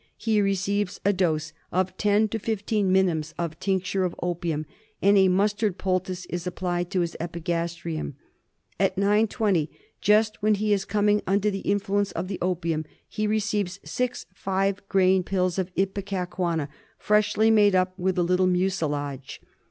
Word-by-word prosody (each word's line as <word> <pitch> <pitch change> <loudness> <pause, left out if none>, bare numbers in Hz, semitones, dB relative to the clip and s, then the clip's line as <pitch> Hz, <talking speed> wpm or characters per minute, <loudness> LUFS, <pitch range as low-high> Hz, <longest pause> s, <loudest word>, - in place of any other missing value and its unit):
he 220 -2 +1
receives 195 0 0
a 200 - +4
dose 160 -4 0 0.2
of 185 +1 0
10 210 +1 +3
to 225 - -3
15 210 -2 0
minims 175 -5 +1
of 165 -2 -4
tincture 190 0 0
of 180 -2 -2
opium, 170 -3 -2 0.3
and 200 +1 +4
a 190 -1 +6
mustard 200 +1 +1
poultice 185 -1 -2
is 175 0 -5
applied 175 -1 -2
to 190 -2 0
his 170 -1 -2
epigastrium. 170 -2 -3 0.6
At 195 -1 +2
9.20, 205 -4 +2 0.3
just 215 +1 +3
when 215 0 +3
he 210 +1 +1
is 195 -1 0
coming 210 0 +2
under 200 +2 +2
the 195 - -3
influence 200 0 0
of 175 +3 -4
the 195 - -4
opium, 170 -3 -1 0.2
he 215 0 -2
receives 205 -3 -1
6 250 0 -2
five 195 +1 -1
grain 190 -1 +4
pills 185 0 0
of 185 0 -2
Ipecacuanha 185 -5 -1 0.3
freshly 210 +1 +3
made 205 -3 +5
up 185 0 +2
with 185 0 0
a 175 - +3
little 180 +1 +2
mucilage. 150 -7 -1
190 Hz, 150 wpm, -25 LUFS, 175-205 Hz, 0.6 s, a